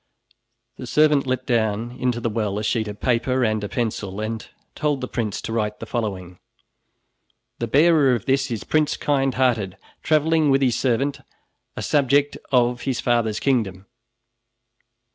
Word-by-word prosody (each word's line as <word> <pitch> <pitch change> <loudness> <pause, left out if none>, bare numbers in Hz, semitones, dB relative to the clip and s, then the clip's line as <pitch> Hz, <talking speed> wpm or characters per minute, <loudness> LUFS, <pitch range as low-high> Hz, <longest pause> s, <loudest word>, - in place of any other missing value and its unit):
The - - -7
servant 150 -3 +3
let 130 0 -1
down 115 -1 0
into 125 -1 -1
the 115 - -2
well 105 -2 -1
a 105 - -3
sheet 110 0 0
of 105 0 -7
paper 125 +1 +1
and 110 -1 0
a 105 - -4
pencil, 105 -5 -3
and 110 +1 -3 0.3
told 150 -2 -1
the 125 - -4
prince 110 -6 -3
to 115 - -4
write 105 -2 -2
the - - -6
following: 95 -6 -4 1.2
"The 115 - -2
bearer 145 0 +4
of 115 - -5
this 135 0 +1
is 115 -4 -4
Prince 155 -1 +1
Kindhearted, 130 -8 0 0.2
traveling 155 0 +2
with 135 0 +3
his 125 -3 +2
servant, 135 +3 0 0.6
a - - -3
subject 145 0 +2 0.2
of 125 -1 +2
his 130 -3 -2
father's 115 -3 +1
kingdom." 105 -8 0
120 Hz, 155 wpm, -22 LUFS, 110-135 Hz, 1.2 s, bearer